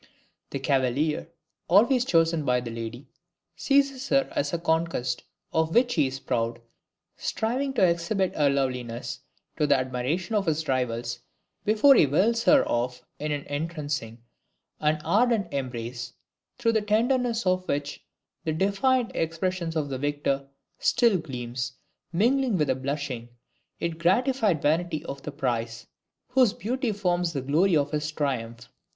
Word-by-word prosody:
The - - -3
cavalier, 140 +3 0 0.4
always 235 +7 +4
chosen 165 -5 +2
by 125 -3 +2
the 120 -1 -6
lady, 115 +3 -6 0.5
seizes 275 -1 +1
her 275 -1 +3
as 290 - 0
a 170 - 0
conquest 160 -7 0 0.3
of 160 0 +1
which 245 +1 +4
he 150 -5 +3
is 130 +1 -5
proud, 115 -3 -1 0.6
striving 255 +5 -1
to 190 -8 +4
exhibit 175 +3 0
her 145 -2 +3
loveliness 125 -2 -2 0.4
to 150 -2 +2
the 140 -1 +5
admiration 130 - -2
of 205 -4 +1
his 155 0 0
rivals, 120 -2 -1 0.5
before 220 +7 +6
he 210 - +6
whirls 225 - +2
her 290 -2 +5
off 125 +1 -1 0.2
in 150 +1 -2
an 145 -1 -2
entrancing 145 -6 -4 0.6
and 155 0 +1
ardent 220 -4 +2
embrace, 120 -2 -4 0.4
through 235 -2 +2
the 220 - +2
tenderness 235 +2 +1
of 185 0 +1
which 145 0 -3 0.4
the 160 - -1
defiant 225 +8 +1
expression 165 +1 -1
of 145 -2 -1
the 130 -1 -3
victor 145 -1 -1 0.3
still 230 -6 +3
gleams, 125 -4 -5 0.4
mingling 240 +4 +2
with 150 -3 +1
the - - +3
blushing 135 -3 -4 0.5
yet 170 -1 -3
gratified 210 - +2
vanity 160 +1 0
of 140 0 -6
the 150 - -6
prize, 115 -3 -2 0.4
whose 250 -4 +4
beauty 245 +2 -2
forms 180 -4 0
the 140 - -2
glory 160 +6 +3
of 145 -1 0
his 150 0 -2
triumph. 125 -5 -3
155 Hz, 145 wpm, -26 LUFS, 130-205 Hz, 0.6 s, before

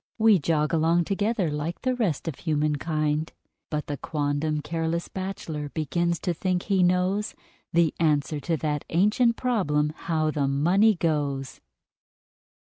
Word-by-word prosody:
We 220 -4 +5
jog 150 +1 0
along 165 +2 +3
together, 200 -3 0
like 150 +3 -4
the 255 -1 +1
rest 200 - -1
of 165 - -1
human 150 -2 0
kind: 155 0 -1 0.4
But 150 -1 -2
the 145 - -4
quondam 150 +1 -1
"careless 165 +1 -2
bachelor" 170 -6 -5
begins 170 +3 -1
to 180 - 0
think 180 +1 -1
he 195 -3 +1
knows 185 +4 +1 0.4
The 165 -2 +3
answer 150 -2 +1
to 160 +3 -1
that 150 -1 -2
ancient 210 +7 +3
problem 155 -13 0
"how 155 -2 -1
the 145 -3 0
money 180 +10 +3
goes"! 145 -5 -2
165 Hz, 140 wpm, -26 LUFS, 150-185 Hz, 0.4 s, We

